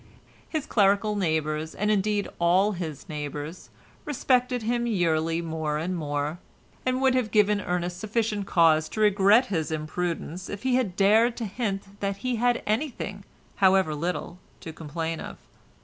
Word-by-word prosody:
His 310 Hz, -3 st, -2 dB
clerical 205 Hz, -1 st, +2 dB
neighbours, 160 Hz, -4 st, -1 dB
and 210 Hz, +1 st, 0 dB
indeed 205 Hz, 0 st, +1 dB
all 180 Hz, +4 st, +4 dB
his 165 Hz, -6 st, -6 dB
neighbours, 150 Hz, +1 st, -6 dB, 0.3 s
respected 250 Hz, -4 st, +1 dB
him 240 Hz, +1 st, 0 dB
yearly 165 Hz, -5 st, +1 dB
more 160 Hz, -2 st, -2 dB
and 175 Hz, +4 st, -2 dB
more, 150 Hz, 0 st, -2 dB, 0.5 s
and 255 Hz, 0 st, +1 dB
would 265 Hz, -1 st, +4 dB
have 250 Hz, -4 st, +1 dB
given 210 Hz, -1 st, +3 dB
Ernest 180 Hz, -1 st, -2 dB
sufficient 215 Hz, -1 st, -1 dB
cause 160 Hz, -2 st, +4 dB
to -, -, -6 dB
regret 210 Hz, +3 st, +5 dB
his 160 Hz, -4 st, -1 dB
imprudence 170 Hz, +3 st, -3 dB
if 205 Hz, -, -6 dB
he 260 Hz, -1 st, +1 dB
had 240 Hz, -8 st, +1 dB
dared 220 Hz, +5 st, +4 dB
to 235 Hz, -, -3 dB
hint 200 Hz, -2 st, -4 dB
that 200 Hz, -1 st, -2 dB
he 250 Hz, -2 st, 0 dB
had 245 Hz, +1 st, +1 dB
anything, 210 Hz, -4 st, -2 dB, 0.3 s
however 190 Hz, -4 st, +4 dB
little, 175 Hz, +3 st, -3 dB, 0.2 s
to 160 Hz, -, -7 dB
complain 160 Hz, +1 st, -4 dB
of. -, -, -7 dB
195 Hz, 150 wpm, -26 LUFS, 165-215 Hz, 0.5 s, regret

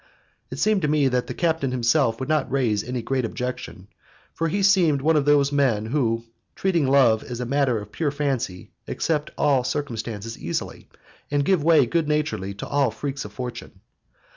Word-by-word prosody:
It -, -, -7 dB
seemed 215 Hz, -2 st, +2 dB
to 150 Hz, -, +1 dB
me 145 Hz, -2 st, +2 dB
that 125 Hz, -1 st, -1 dB
the -, -, -4 dB
captain 160 Hz, -5 st, 0 dB
himself 120 Hz, -1 st, +1 dB
would 130 Hz, -, -4 dB
not 155 Hz, -4 st, 0 dB
raise 115 Hz, -6 st, +1 dB
any 125 Hz, -1 st, -4 dB
great 130 Hz, +1 st, -1 dB
objection, 115 Hz, -5 st, -5 dB, 0.5 s
for 165 Hz, -, -1 dB
he 195 Hz, +5 st, -1 dB
seemed 180 Hz, -7 st, +4 dB
one 160 Hz, +4 st, +2 dB
of 145 Hz, -2 st, +2 dB
those 145 Hz, -1 st, +4 dB
men 130 Hz, -7 st, +1 dB
who, 115 Hz, -2 st, 0 dB, 0.3 s
treating 170 Hz, -7 st, +1 dB
love 125 Hz, -5 st, +4 dB
as 120 Hz, -1 st, -6 dB
a 125 Hz, -, -2 dB
matter 135 Hz, -2 st, +1 dB
of 105 Hz, 0 st, -10 dB
pure 160 Hz, -3 st, -1 dB
fancy, 135 Hz, -10 st, -3 dB, 0.2 s
accept 150 Hz, -2 st, -1 dB
all 140 Hz, -4 st, +3 dB
circumstances 115 Hz, -5 st, -4 dB
easily, -, -, -5 dB, 0.4 s
and 145 Hz, -1 st, +1 dB
give 185 Hz, -4 st, +2 dB
way 160 Hz, -4 st, +5 dB
good 160 Hz, +5 st, 0 dB
naturedly 150 Hz, -11 st, -1 dB
to -, -, -7 dB
all 140 Hz, -3 st, +2 dB
the -, -, -11 dB
freaks 140 Hz, -3 st, -4 dB
of 105 Hz, -, -8 dB
fortune. 125 Hz, +3 st, -7 dB
135 Hz, 190 wpm, -23 LUFS, 120-150 Hz, 0.5 s, way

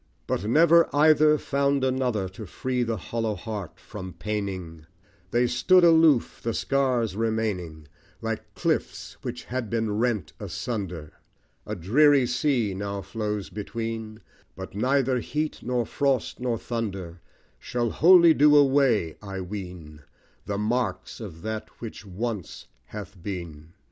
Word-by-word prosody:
But -, -, -1 dB
never 165 Hz, +8 st, +5 dB
either 155 Hz, 0 st, +5 dB
found 140 Hz, -1 st, 0 dB
another 125 Hz, -6 st, 0 dB
To 95 Hz, +2 st, -9 dB
free 125 Hz, +6 st, -2 dB
the 115 Hz, -2 st, -1 dB
hollow 110 Hz, +6 st, -2 dB
heart 105 Hz, -7 st, -6 dB
from 95 Hz, -1 st, -8 dB
paining 90 Hz, -3 st, -5 dB, 0.4 s
They 120 Hz, +4 st, +2 dB
stood 180 Hz, +9 st, +4 dB
aloof 160 Hz, -6 st, +4 dB
the 115 Hz, -1 st, -2 dB
scars 125 Hz, -7 st, +1 dB
remaining, 105 Hz, -9 st, -2 dB, 0.3 s
Like 115 Hz, -1 st, -5 dB
cliffs -, -, -2 dB
which -, -, -5 dB
had 125 Hz, -3 st, -4 dB
been 110 Hz, -2 st, -1 dB
rent 115 Hz, -7 st, 0 dB
asunder; 90 Hz, -10 st, -5 dB, 0.5 s
A 105 Hz, -, -3 dB
dreary 135 Hz, -, +4 dB
sea 125 Hz, -4 st, +1 dB
now 100 Hz, +1 st, -4 dB
flows 105 Hz, +1 st, -4 dB
between; 110 Hz, +1 st, -5 dB, 0.3 s
But -, -, -8 dB
neither 130 Hz, +4 st, +1 dB
heat, 150 Hz, +6 st, -3 dB
nor 125 Hz, -1 st, -1 dB
frost, 135 Hz, +2 st, 0 dB
nor 125 Hz, -2 st, -1 dB
thunder, 95 Hz, -8 st, -5 dB, 0.4 s
Shall 120 Hz, -2 st, -2 dB
wholly 170 Hz, 0 st, +7 dB
do 150 Hz, 0 st, +5 dB
away, 135 Hz, -, +3 dB
I 100 Hz, -2 st, -6 dB
ween, 90 Hz, -6 st, -8 dB, 0.5 s
The 100 Hz, -, -2 dB
marks 120 Hz, +4 st, -2 dB
of 95 Hz, -7 st, -9 dB
that 110 Hz, 0 st, -4 dB
which 110 Hz, -3 st, -8 dB
once 105 Hz, 0 st, -5 dB, 0.2 s
hath 100 Hz, -, -9 dB
been. 85 Hz, -4 st, -7 dB
110 Hz, 130 wpm, -26 LUFS, 95-130 Hz, 0.5 s, wholly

